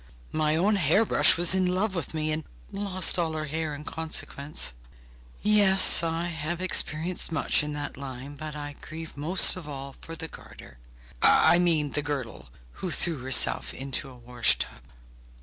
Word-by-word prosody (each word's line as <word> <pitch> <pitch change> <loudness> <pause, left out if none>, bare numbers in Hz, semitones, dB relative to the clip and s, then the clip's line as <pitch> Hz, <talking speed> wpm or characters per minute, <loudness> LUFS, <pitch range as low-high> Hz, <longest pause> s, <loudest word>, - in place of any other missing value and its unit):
My 155 0 +1
own 200 +6 +2
hair 190 +6 +3
brush - - +5
was 175 +1 +3
in 190 -1 +1
love 185 +3 0
with 170 -2 -4
me, 155 0 -1
and 155 +1 -3 0.3
lost 195 -3 +1
all 165 -2 -1
her 155 -1 -3
hair 155 0 -4
in 145 - -9
consequence. 150 - -2 0.7
Yes, 200 -4 +5
I 165 0 -2
have 165 0 -4
experienced 175 -1 0
much 160 - +2
in 150 0 -4
that 145 0 -6
line; 135 +1 -8
but 155 +1 -7
I 145 -1 -6
grieve 160 +1 -9
most 160 +6 +3
of 180 -4 -8
all 140 -1 -7
for 165 - -10
the 160 - -6
garter, 60 - -13 0.4
I 170 - +5
mean, 160 -5 +1
the 150 - -2
girdle, 130 - -6 0.3
who 185 - -3
threw 165 -2 -1
herself 130 0 +2
into 135 +1 -3
a 130 - -14
wash 120 0 +1
tub. - - -5
155 Hz, 170 wpm, -26 LUFS, 145-175 Hz, 0.7 s, brush